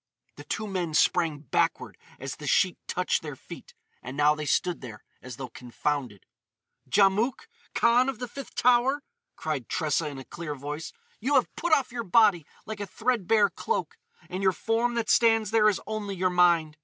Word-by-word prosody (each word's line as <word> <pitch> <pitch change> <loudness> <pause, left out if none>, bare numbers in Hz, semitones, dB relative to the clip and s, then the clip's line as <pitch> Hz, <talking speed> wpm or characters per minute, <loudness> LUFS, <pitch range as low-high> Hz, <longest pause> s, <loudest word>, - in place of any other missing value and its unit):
The - - -10
two 220 - -3
men 180 -6 -3
sprang 160 -3 +2
backward 140 - -1 0.2
as - - -6
the - - -8
sheet - - +3
touched - - 0
their - - -7
feet, - - -12 0.3
and 130 +3 -8
now 150 +1 +5
they 150 0 -5
stood 180 +2 0
there 110 -5 -10 0.2
as 125 -2 -8
though 130 0 -7
confounded. 125 -3 -4 0.6
"Djamouk, 210 - +2 0.3
Kahn 245 +3 +4
of 265 - -4
the 245 +1 -5
Fifth 275 +3 -9
Tower!" 250 +4 +3 0.3
cried 150 -7 -4
Tressa 155 0 0
in 145 -2 -6
a 135 - -9
clear 165 -4 -6
voice, 145 +3 -6 0.3
"you 275 +6 0
have 255 - +2
put 345 +1 -2
off 275 -5 +3
your 240 -1 -4
body 195 -5 +4 0.2
like 215 -1 -6
a 205 - -4
threadbare 220 -3 +1
cloak, 460 - -3 0.3
and 185 +1 -5
your 190 -1 +3
form 230 +4 0
that 230 -2 -1
stands 225 -2 +3
there 215 -1 +5
is 205 - -1
only 210 -2 -4
your 185 0 +1
mind! 170 -3 +3
190 Hz, 180 wpm, -27 LUFS, 150-230 Hz, 0.6 s, now